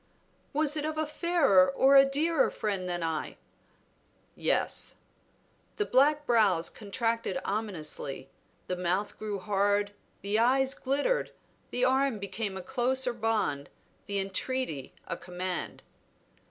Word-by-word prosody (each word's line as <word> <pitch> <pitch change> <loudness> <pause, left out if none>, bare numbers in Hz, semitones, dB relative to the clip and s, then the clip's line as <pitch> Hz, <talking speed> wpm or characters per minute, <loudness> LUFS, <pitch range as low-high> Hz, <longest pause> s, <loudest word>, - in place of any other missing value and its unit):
"Was 300 0 +2
it 300 - -2
of 310 0 -3
a 310 - +1
fairer 300 - +3
or 265 +9 +4
a 270 0 +7
dearer 310 +2 +2
friend 195 -4 -3
than 175 -1 -2
I?" 160 -1 -3 1.0
"Yes." - - 0 0.8
The 420 - 0
black 295 +2 +3
brows 205 - +3
contracted 230 +4 -2
ominously, 170 -10 -3 0.4
the 180 - -2
mouth 180 +3 -1
grew 210 -2 -3
hard, 205 +1 +1 0.3
the 205 +2 +1
eyes 265 +3 +3
glittered, 285 - -1 0.4
the 250 +1 +1
arm 265 -2 +2
became 200 0 -4
a 190 - -6
closer 260 0 0
bond, 210 -11 -1 0.4
the 200 -1 -1
entreaty 195 - -2
a 170 - -3
command. 180 +1 -5
220 Hz, 125 wpm, -29 LUFS, 190-270 Hz, 1.0 s, a